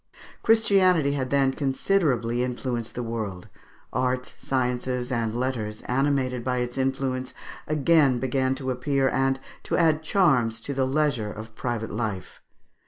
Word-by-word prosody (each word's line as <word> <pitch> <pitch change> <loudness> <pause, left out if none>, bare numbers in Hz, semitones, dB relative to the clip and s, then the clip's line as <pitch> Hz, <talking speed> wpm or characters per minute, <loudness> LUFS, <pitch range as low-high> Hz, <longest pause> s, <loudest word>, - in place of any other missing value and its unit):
Christianity 190 -9 +4
had 135 -2 -2
then 135 -1 +3
considerably 135 -5 +1
influenced 125 -2 -3
the 125 - -3
world; 110 -6 -5 0.4
arts, 125 +1 -1
sciences, 125 -1 -1
and 115 -2 -1
letters, 115 -5 -3
animated 130 -2 0
by 125 0 0
its 125 0 -2
influence, 130 -1 -2 0.3
again 150 -3 +3
began 130 +1 0
to 130 -1 -3
appear, 135 +1 +1
and 135 +1 +1 0.2
to - - -1
add 160 -2 +3
charms 130 - +2
to 140 - -4
the 135 -1 +1
leisure 135 -7 0
of 110 +1 -9
private 115 -1 -3
life. 105 -4 -4
130 Hz, 135 wpm, -25 LUFS, 120-140 Hz, 0.4 s, Christianity